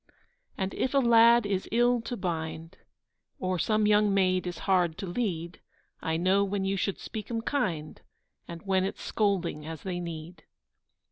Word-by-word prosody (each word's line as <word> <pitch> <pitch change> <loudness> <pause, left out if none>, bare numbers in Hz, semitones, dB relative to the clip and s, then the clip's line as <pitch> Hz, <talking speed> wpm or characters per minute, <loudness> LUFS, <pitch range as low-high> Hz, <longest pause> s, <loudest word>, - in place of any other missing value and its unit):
And 190 -1 -2
if 260 - -1
a - - +5
lad 235 -2 +6
is 195 -2 -2
ill 240 +1 +3
to 240 +1 -4
bind, 165 -1 -4 0.6
Or 185 -1 -2
some 215 +4 +2
young 210 0 +4
maid 185 -2 +2
is 175 - -4
hard 180 -4 +2
to - - -5
lead, 175 -4 -3 0.4
I 160 0 -1
know 190 +4 +3
when 200 -1 -1
you 195 +1 0
should 195 0 -1
speak 215 -1 -7
'em 230 -1 -2
kind, 175 - -2 0.5
And 170 -1 -8
when 190 -1 +1
it's 195 - -4
scolding 185 -7 0
as 160 0 -7
they 180 -2 -3
need. 170 -1 -7
190 Hz, 165 wpm, -28 LUFS, 170-210 Hz, 0.6 s, lad